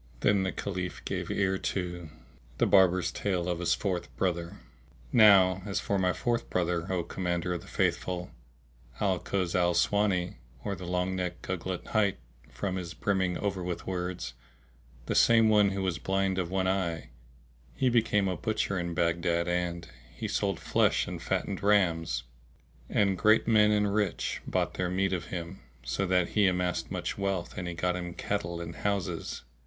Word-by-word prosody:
Then 100 -1 +3
the 95 - 0
Caliph 90 -2 -4
gave - - -3
ear 95 -1 +1
to 85 -3 -3 0.5
The - - +3
Barber's 95 -2 +4
Tale 90 -4 -1
of 90 -1 -1
his 90 - +2
Fourth 95 -4 -2
Brother. 85 -2 -1 0.6
Now 95 -4 +6
as 100 - -1
for 100 -1 -1
my 90 -1 +2
fourth 120 +5 -1
brother, 85 -1 -1
O 90 -2 0
Commander 90 0 -2
of 85 - -4
the - - -14
Faithful, 90 -1 -1 0.7
Al 95 -3 +1
Kuz 95 -3 -2
al 85 -1 +2
aswáni, 95 -2 +1 0.3
or 100 - -2
the 90 -2 -7
long 90 +1 0
necked 90 -1 -3
Gugglet 95 0 -4
hight, 105 -3 +2 0.3
from 95 -2 -3
his 90 -1 -6
brimming 95 -3 0
over 100 -3 -2
with 90 -1 -4
words, 90 -6 -3 0.7
the - - -1
same 115 -1 +5 0.2
who 95 0 -2
was 90 -3 -1
blind 95 0 0
of 90 -2 -2
one 95 0 0
eye, 90 -6 -1 0.6
he 130 - +1
became 110 -4 +3
a 95 - -1
butcher 100 +1 -1
in 85 -1 -3
Baghdad 85 0 +1
and 90 -1 -1 0.3
he - - -4
sold - - -1
flesh - - +2
and - - -5
fattened 100 - -2
rams; 85 -10 +2 0.7
and 100 -2 +2
great 110 +1 +4
men 105 -2 +5
and 105 -1 +2
rich 105 -4 -1
bought - - 0
their 90 -1 -1
meat 95 +1 0
of 85 -2 -2
him, 90 +1 -6 0.2
so 70 +11 -1
that 90 -1 +2
he 105 -2 +3
amassed 90 -1 0
much - - -3
wealth 95 -3 -2
and 90 -2 -5
got 90 +1 0
him 90 -1 -5
cattle 85 -4 -3
and 85 -1 -7
houses. 100 -2 -2
90 Hz, 170 wpm, -29 LUFS, 85-100 Hz, 0.7 s, Now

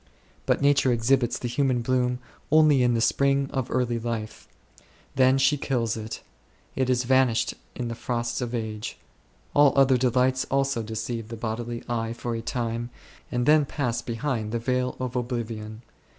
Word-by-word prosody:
But - - +2
Nature 140 -2 +4
exhibits 120 +1 +2
the 120 - -4
human 125 0 +1
bloom 125 0 +1 0.3
only 155 -3 +5
in 120 -1 +3
the 115 - +1
spring 140 +3 +2
of 130 -3 -2
early 120 -2 0
life; 115 -2 -5 0.7
then 130 0 +5
she 135 +2 +3
kills 120 -5 -1
it; 110 0 -6 0.5
it 130 -1 0
is 125 0 +2
vanished 130 -2 +2 0.2
in 125 - -3
the 115 - -3
frosts 120 +1 -3
of 120 0 -3
age. 110 -2 -4 0.6
All 145 -2 +5
other 135 -1 +5
delights 130 +1 +2
also 135 -3 +1
deceive 110 +1 -4
the 115 0 -7
bodily 115 +1 -4
eye 115 -1 -2
for 120 0 -4
a 115 - -3
time, 115 0 -3 0.4
and 120 0 0
then 150 +1 +5
pass 125 -4 -2
behind 115 -2 -3
the 120 - 0
veil 125 +2 -1
of 130 -1 -4
oblivion. 115 -3 -4
120 Hz, 165 wpm, -26 LUFS, 115-130 Hz, 0.7 s, only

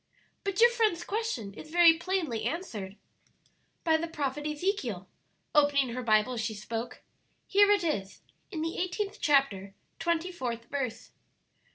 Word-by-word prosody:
"But 395 -2 -2
your 475 +1 +7
friend's 440 -7 +1
question 400 - -3
is 305 +9 -11
very 340 0 +7
plainly 330 - -2
answered 215 - -4 0.9
by 320 -1 +4
the 335 +1 -3
prophet 295 -2 -3
Ezekiel," 295 - -2 0.5
opening 285 -3 +4
her 250 +2 -4
Bible 220 +1 +3
as 235 - -2
she 220 0 -2
spoke. 225 +3 -5 0.4
"Here 405 +1 +5
it 410 -3 +4
is, 200 - -2 0.3
in 320 -5 -3
the 330 +1 -3
eighteenth 390 +3 -2
chapter, 240 - +2 0.2
twenty 340 +2 0
fourth 240 -8 -4
verse. 250 -5 -3
295 Hz, 145 wpm, -29 LUFS, 230-355 Hz, 0.9 s, your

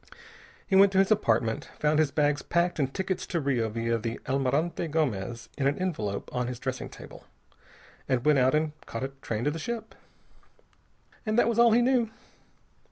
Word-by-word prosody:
He 190 - 0
went 195 0 +7
to - - +1
his 195 +2 +4
apartment, 120 - +1
found 150 0 +2
his 155 -3 +3
bags 145 0 +1
packed 175 -1 0
and 135 -2 0
tickets 190 +3 -3
to 170 - -1
Rio 130 -6 0
via 115 +1 -1
the 115 +1 -4
Almirante 140 +6 0
Gomez 120 -8 -2
in 135 - +2
an 140 - +1
envelope 110 - -3
on 125 -1 -1
his 125 -1 -4
dressing 130 0 -4
table, - - -12 0.8
and 130 -1 +1
went 150 -2 +5
out 130 +3 +3
and 155 0 +1 0.2
caught 115 - -5
a 135 - -2
train 110 0 -3
to 145 - +1
the 165 - -5
ship. 225 +5 -5 1.3
And 215 0 -1
that 240 - +4
was 235 0 +1
all 235 -1 +7
he 240 +1 +4
knew. 245 -3 +2
145 Hz, 185 wpm, -28 LUFS, 125-185 Hz, 1.3 s, went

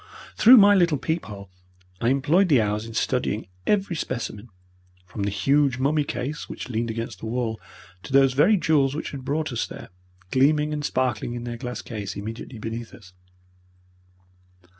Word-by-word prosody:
Through 245 +4 +8
my 205 -1 +7
little 170 -6 +3
peep 160 +5 -2
hole 100 -2 -10 0.5
I 115 - +2
employed 155 +8 +3
the 140 -5 +5
hours 105 +1 -1
in 115 - -9
studying 110 -5 -1 0.2
every 195 -4 +1
specimen, 120 -6 -5 0.6
from 100 +3 -7
the 100 - 0
huge 135 +6 +2
mummy 145 +3 +1
case 145 +1 -5
which - - -7
leaned 115 0 -2
against 115 0 -5
the 110 - -6
wall 115 -1 -2 0.4
to - - -10
those 135 -1 +5
very 170 +11 +4
jewels 145 -5 +2
which 155 - -4
had 135 -2 -7
brought 150 +2 -2
us 115 - -2
there, - - -10 0.4
gleaming 150 +3 +3
and 150 -1 -3
sparkling 130 -3 -1
in 120 - -5
their 120 -1 -5
glass 125 0 -6
case 105 -4 -6
immediately 110 +4 -7
beneath 115 +1 -6
us. 90 -5 -16
130 Hz, 170 wpm, -24 LUFS, 115-150 Hz, 0.6 s, Through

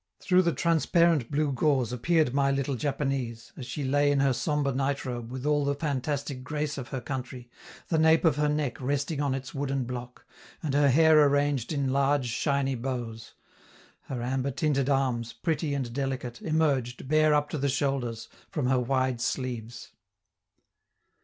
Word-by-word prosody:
Through 185 -1 +3
the 170 -2 +1
transparent 165 -4 +2
blue 150 0 0
gauze 130 -2 +1
appeared 155 +2 +1
my 140 0 +2
little 140 0 0
Japanese, 135 -3 -3
as 125 - -8
she 135 +4 -4
lay 145 +2 +2
in 140 - +2
her 135 -1 +3
sombre 145 +1 0
night 140 +2 -1
robe 120 -2 -5
with 130 +2 -6
all 150 -1 +2
the 140 0 0
fantastic 140 -2 -3
grace 150 +1 -3
of 125 - -6
her 130 - -4
country, 125 -1 -6 0.4
the 160 - +2
nape 160 +2 +4
of 160 - +4
her 150 0 +2
neck 150 -5 -2
resting 145 +3 -1
on 140 -2 0
its 130 -1 -6
wooden 135 -1 -1
block, 125 0 -7 0.4
and 150 -4 -1
her 145 0 +4
hair 155 +2 +6
arranged 145 -3 +1
in 140 -3 0
large, 140 0 +2
shiny 140 +2 0
bows. 120 -3 -5 0.7
Her 125 -3 -4
amber 130 +2 -1
tinted 140 0 0
arms, 125 -4 0
pretty 155 -3 -1
and 125 -4 -3
delicate, 130 -3 -3
emerged, 140 -6 0
bare 155 +1 +4
up 145 0 0
to 155 - -2
the 140 +1 +1
shoulders, 130 -4 -1 0.2
from 150 -5 -2
her 130 0 +3
wide 130 -1 0
sleeves. 120 -2 -4
135 Hz, 170 wpm, -28 LUFS, 125-145 Hz, 0.7 s, hair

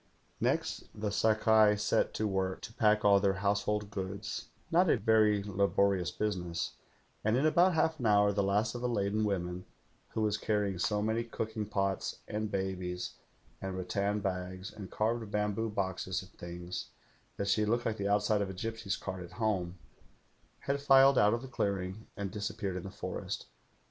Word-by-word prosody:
" - - -34
Next - - -3
the 105 -1 -1
Sakai 110 0 +4
set 105 - +1
to 110 - 0
work 95 -1 -1
to 115 - -8
pack 105 -4 +3
all 100 -1 +7
their 100 -1 +2
house 100 0 +3
hold 105 -1 -1
goods 100 +4 -4
— - - -33
not 175 +1 +4
a - - +4
very 105 -2 +3
laborious 100 -2 +2
business; 90 -4 -2 0.5
and 110 +3 +2
in 135 - +2
about 175 +3 +4
half 160 0 +2
an 120 - 0
hour 105 -1 +5
the 100 - +1
last 105 +3 +1
of 120 - -5
the 125 - 0
laden 105 -2 0
won^en, 90 -3 -2 0.5
who 110 - -2
Was 105 0 +1
carrying 105 -4 0
so 105 +3 +1
many 110 +2 0
cooking 110 -2 -4
pots, 100 -2 -1
and 105 0 -2
babies 95 -2 -3 0.5
and 95 -1 -4
rattan 100 +3 -1
bags 95 0 -4
and 100 -3 -8
carved 110 0 -1
bamboo 105 +2 0
boxes 95 -2 -2
and 95 - -16
things, 85 +1 -6 0.5
that 100 - -2
she 105 +2 +3
looked 115 +3 +1
like 110 -1 -1
the 100 - -1
outside 105 +1 +2
of 100 - -1
a 95 - -6
gipsy's 110 0 -3
cart 95 -1 -5
at 85 - -11
home, 95 -6 -1 0.8
had 140 0 -1
filed 135 -1 +6
out 105 +2 +5
of 120 - -6
the - - -6
clearing 100 -3 -2
and 100 -2 -3
disappeared 100 -2 -3
in - - -4
the 95 - -7
forest. 95 -2 -5
105 Hz, 185 wpm, -32 LUFS, 95-110 Hz, 0.8 s, all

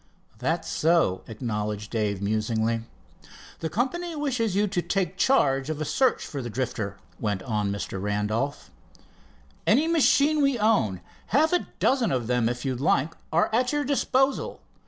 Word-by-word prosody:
"That's 160 +6 -1
so," 160 - +2
acknowledged 105 -2 -4
Dave 105 -4 -1
musingly. 110 +2 0 0.8
"The 160 - -3
company 335 - -2
wishes 250 -9 -1
you 205 +1 +3
to 185 -3 -1
take 180 0 -1
charge 140 - +2
of 155 -1 -3
a 155 - -2
search 260 - +1
for 140 - -5
the 120 - -5
Drifter," 110 -4 -3 0.2
went 100 -4 -2
on 105 -2 -1
Mr. 100 -1 -4
Randolph. 105 +8 -2 1.0
"Any 305 +4 +4
machine 310 -2 +4
we 275 -3 +3
own, 205 - +2 0.3
half 310 - +3
a 355 - +1
dozen 260 -4 +2
of 125 -3 0
them 120 -1 +1
if 125 +1 -4
you 130 -1 0
like, 140 +4 +1 0.2
are 170 +6 +2
at 250 +2 +2
your 295 0 0
disposal. 270 -1 +1
145 Hz, 155 wpm, -26 LUFS, -, 1.0 s, Any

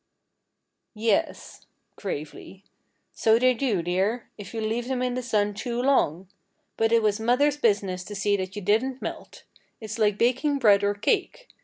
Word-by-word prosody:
"Yes," 215 -1 -2 0.3
gravely, 185 +2 -7 0.5
"so 220 0 +3
they 255 +1 +4
do, 230 -8 -1
dear, 195 +7 -1
if 205 - -10
you 230 - -5
leave 225 +2 -2
them 255 -1 -1
in 250 -1 -1
the 255 - -2
sun 210 -4 0
too 235 +3 -4
long. 195 - +1 0.5
But 225 0 +1
it 230 -1 +4
was 210 0 +1
mother's 260 +6 +2
business 200 -7 0
to 205 - -8
see 200 +1 +1
that 190 0 -5
you 205 - -6
didn't 250 +7 0
melt. - - -7 0.4
It's 220 0 -7
like 210 -2 +2
baking 260 +5 +1
bread 205 -6 +4
or 205 0 +1
cake. 390 - -1
220 Hz, 165 wpm, -25 LUFS, 200-245 Hz, 0.5 s, they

